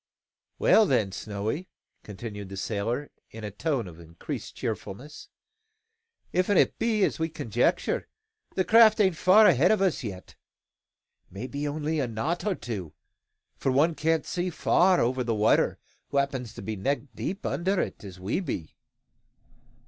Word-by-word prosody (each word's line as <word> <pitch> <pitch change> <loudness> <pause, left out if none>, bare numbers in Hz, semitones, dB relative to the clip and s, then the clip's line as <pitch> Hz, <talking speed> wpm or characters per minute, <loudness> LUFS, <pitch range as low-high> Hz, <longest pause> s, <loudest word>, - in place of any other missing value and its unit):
"Well, 220 -2 +5
then, 110 - +1
Snowy," 105 - -4 0.3
continued 105 -1 -8
the 95 - -7
sailor, 115 +8 -2 0.2
in 110 0 -10
a 105 - -4
tone 125 - -2
of 85 -2 -11
increased 85 0 -7
cheerfulness, 130 +10 -6 1.1
"if't 185 +2 +2
be 220 -3 +2
as - - 0
we 160 0 0
conjecture, 120 -6 0 0.5
the 185 - +1
craft 220 -1 +6
ain't 190 -4 +3
far 190 +6 +6
ahead 175 -3 +5
o' 200 -3 +3
us 185 - 0
yet. 95 -5 -7 0.9
Maybe 130 +9 -5
only 155 +2 -2
a 135 - 0
knot 145 - -2
or 200 - +1
two; 105 - -6 0.6
for 135 - 0
one 150 +6 +3
can't 160 0 0
see 180 +1 -2
far 180 +2 +3
over 125 +2 +1
the 115 -2 -1
water 105 +1 +3 0.3
who 140 - -3
happens 135 -4 -1
to - - -8
be 110 +2 -3
neck 130 +7 -1
deep 195 +3 -5
under 190 +2 0
it - - -3
as 95 -2 -10
we 95 - -1
be. 85 - -5
135 Hz, 150 wpm, -27 LUFS, 105-175 Hz, 1.1 s, craft